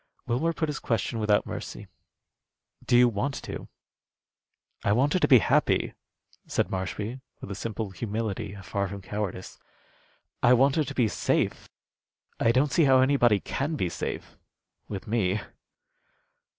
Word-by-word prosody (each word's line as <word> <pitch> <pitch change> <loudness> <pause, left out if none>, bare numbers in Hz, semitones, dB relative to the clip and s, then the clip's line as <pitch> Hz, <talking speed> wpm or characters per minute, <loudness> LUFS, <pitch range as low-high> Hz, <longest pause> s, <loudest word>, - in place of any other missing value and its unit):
Wilmer 125 +8 +1
put 160 -1 -2
his 150 - -3
question 115 0 -1
without 105 -1 +2
mercy. - - -6 1.0
"Do 120 - +4
you 125 0 +7
want 120 +5 -1
to?" - - -6 1.2
"I 100 - +3
want 135 +6 +2
her 185 - +3
to - - +3
be 130 - +8
happy," 105 - +2 0.5
said - - 0
Marshby, 105 +6 -3 0.2
with - - -8
a - - -2
simple 105 0 -4
humility 105 +1 -3
afar 100 0 -3
from 100 0 -8
cowardice. 100 -2 -5 0.8
"I 120 - +6
want 135 +2 +4
her 155 - +3
to 140 0 -7
be 120 -4 +3
safe. - - -1 0.7
I 115 - +4
don't 135 +4 +2
see 160 +1 +4
how 130 -1 +6
anybody 130 -5 +4
could 150 +9 -2
be 90 - 0
safe - - -5 0.5
with 100 -2 -6
me." 105 -3 +1
115 Hz, 150 wpm, -27 LUFS, 100-135 Hz, 1.2 s, be